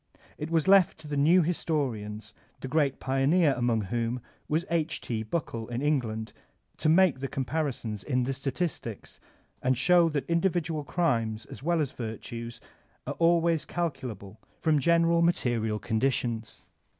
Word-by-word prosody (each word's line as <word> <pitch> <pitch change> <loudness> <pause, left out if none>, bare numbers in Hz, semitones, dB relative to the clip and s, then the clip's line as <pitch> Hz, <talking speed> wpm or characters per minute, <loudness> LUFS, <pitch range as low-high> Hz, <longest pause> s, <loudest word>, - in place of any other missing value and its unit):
It 150 - -4
was 165 -1 +1
left 195 -2 +5
to 155 - -11
the 145 - -3
new 165 +6 +5
historians, 130 -11 -2 0.3
the - - -4
great 140 -1 +1
pioneer 140 +4 +3
among 120 -2 +1
whom 115 +4 -2 0.3
was 160 +3 0
H. 165 -1 0
T. 115 -2 -3
Buckle 115 -2 -3
in 120 +3 -3
England, 115 -7 -1 0.4
to 155 - +1
make 170 -4 +4
the 135 - -3
comparisons 130 -7 -3
in 125 -3 0
the 135 +2 -1
statistics, 135 - -4 0.4
and 130 0 +1
show 175 +4 +5
that 150 -3 -2
individual 170 -3 0
crimes 115 -10 0
as - - -9
well 170 +3 +1
as 145 -4 0
virtues 115 +1 -6 0.5
are - - -3
always 170 -1 +3
calculable 125 - -4 0.2
from 155 -2 +2
gen* 170 +3 +4
eral 170 0 +3
material 120 -10 +1
conditions. 115 0 -1
140 Hz, 150 wpm, -28 LUFS, 115-165 Hz, 0.5 s, left